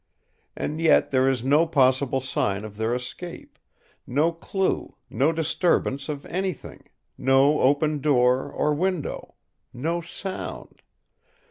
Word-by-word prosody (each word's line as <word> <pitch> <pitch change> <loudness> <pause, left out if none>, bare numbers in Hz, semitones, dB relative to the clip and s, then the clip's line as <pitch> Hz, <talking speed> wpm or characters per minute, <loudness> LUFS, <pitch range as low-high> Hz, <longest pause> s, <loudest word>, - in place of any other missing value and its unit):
And 155 +2 -3
yet 165 - +4
there 130 0 +3
is 130 -3 -1
no 150 +5 +3
possible 135 -2 +2
sign 105 -5 -1
of 105 -1 -9
their 110 +2 0
escape; 125 +8 -8 0.5
no 150 +6 +2
clue, 190 +3 -2 0.2
no 135 +8 +2
disturbance 160 -3 0
of 145 -2 -5
anything; 185 -3 -5 0.3
no 135 +3 +4
open 145 +2 +2
door 130 -3 +2
or 150 - 0
window; 180 0 -3 0.4
no 165 +7 -2
sound. 185 +3 -7
145 Hz, 120 wpm, -25 LUFS, 130-165 Hz, 0.5 s, yet